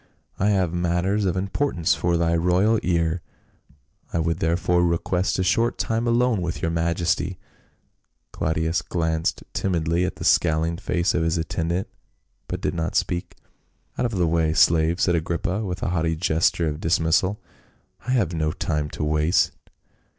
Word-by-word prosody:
" -, -, -49 dB
I 100 Hz, -, +2 dB
have 95 Hz, -5 st, +1 dB
matters 90 Hz, +4 st, 0 dB
of 95 Hz, -1 st, 0 dB
im 95 Hz, +2 st, -2 dB
portance 95 Hz, -, 0 dB
for 85 Hz, -1 st, 0 dB
thy 85 Hz, 0 st, +1 dB
royal 90 Hz, +6 st, +2 dB
ear. 85 Hz, -1 st, 0 dB, 0.9 s
I -, -, -1 dB
would 85 Hz, +1 st, 0 dB
therefore 90 Hz, 0 st, +1 dB
request 90 Hz, +2 st, 0 dB
a 95 Hz, -, +1 dB
short 115 Hz, +6 st, +1 dB
time 115 Hz, +1 st, -1 dB
alone 120 Hz, -3 st, +2 dB
with 85 Hz, -1 st, -3 dB
your 80 Hz, -, -1 dB
majesty." 85 Hz, +2 st, 0 dB, 0.9 s
Claudius 80 Hz, +1 st, -1 dB
glanced 80 Hz, -2 st, -1 dB
timidly 85 Hz, -2 st, 0 dB
at 90 Hz, -, -2 dB
the -, -, -8 dB
scowling 80 Hz, 0 st, +2 dB
face 85 Hz, 0 st, 0 dB
of 85 Hz, -, +1 dB
his 80 Hz, +1 st, +1 dB
attendant, 85 Hz, +3 st, -2 dB, 0.6 s
but -, -, -4 dB
did -, -, -1 dB
not 85 Hz, -1 st, -3 dB
speak. 85 Hz, -1 st, -1 dB, 0.6 s
"Out 125 Hz, -, 0 dB
of 115 Hz, -, -5 dB
the 90 Hz, -2 st, +2 dB
way, 80 Hz, -1 st, +1 dB
slave," 80 Hz, +1 st, +3 dB
said 90 Hz, -, +2 dB
Agrippa 85 Hz, +5 st, -1 dB
with 90 Hz, -3 st, -4 dB
a -, -, 0 dB
haughty 80 Hz, -2 st, 0 dB
gesture 80 Hz, 0 st, +1 dB
of 75 Hz, 0 st, -3 dB
dismissal. 85 Hz, +4 st, +1 dB, 0.3 s
" -, -, -28 dB
I 130 Hz, -, +1 dB
have 100 Hz, -9 st, +1 dB
no 80 Hz, -2 st, 0 dB
time 75 Hz, 0 st, -2 dB
to -, -, -2 dB
waste." 75 Hz, +2 st, +2 dB
85 Hz, 165 wpm, -23 LUFS, 80-95 Hz, 0.9 s, slave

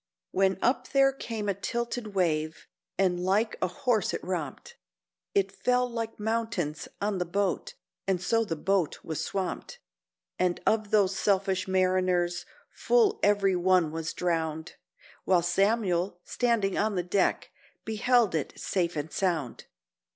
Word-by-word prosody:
When 190 Hz, 0 st, +2 dB
up 250 Hz, +3 st, +1 dB
there 270 Hz, -1 st, +5 dB
came 225 Hz, -5 st, -5 dB
a 200 Hz, -, +2 dB
tilted 235 Hz, +1 st, -4 dB
wave, 155 Hz, -4 st, 0 dB, 0.3 s
and 185 Hz, -2 st, +2 dB
like 205 Hz, +4 st, +1 dB
a 185 Hz, -, +2 dB
horse 215 Hz, +2 st, 0 dB
it -, -, -6 dB
romped, 170 Hz, -7 st, -5 dB, 0.6 s
It 195 Hz, -1 st, +2 dB
fell 250 Hz, +6 st, +1 dB
like 230 Hz, -2 st, -5 dB
mountains 210 Hz, -8 st, -2 dB
on 200 Hz, -2 st, -1 dB
the 180 Hz, -, 0 dB
boat, 195 Hz, +2 st, -1 dB, 0.3 s
and 190 Hz, -2 st, +1 dB
so 225 Hz, +6 st, +1 dB
the 170 Hz, -7 st, -3 dB
boat 185 Hz, +1 st, 0 dB
was 160 Hz, -2 st, -3 dB
swamped; 195 Hz, -, -4 dB, 0.6 s
And 180 Hz, -1 st, +1 dB
of 215 Hz, -1 st, +2 dB
those 200 Hz, -3 st, +3 dB
selfish 195 Hz, -1 st, +1 dB
mariners 185 Hz, -2 st, +1 dB, 0.2 s
full 445 Hz, -4 st, +2 dB
every 200 Hz, -2 st, +3 dB
one 180 Hz, -3 st, +3 dB
was 165 Hz, 0 st, -4 dB
drowned, 160 Hz, -2 st, -2 dB, 0.5 s
While 180 Hz, -2 st, +3 dB
Samuel, 185 Hz, -1 st, +1 dB
standing 230 Hz, -6 st, 0 dB
on 210 Hz, 0 st, +1 dB
the 180 Hz, -, 0 dB
deck, 180 Hz, +3 st, 0 dB, 0.3 s
beheld 225 Hz, -1 st, +2 dB
it 155 Hz, -4 st, -3 dB
safe 175 Hz, -3 st, -1 dB
and 150 Hz, +1 st, -4 dB
sound. 165 Hz, -10 st, -1 dB
190 Hz, 140 wpm, -28 LUFS, 175-215 Hz, 0.6 s, there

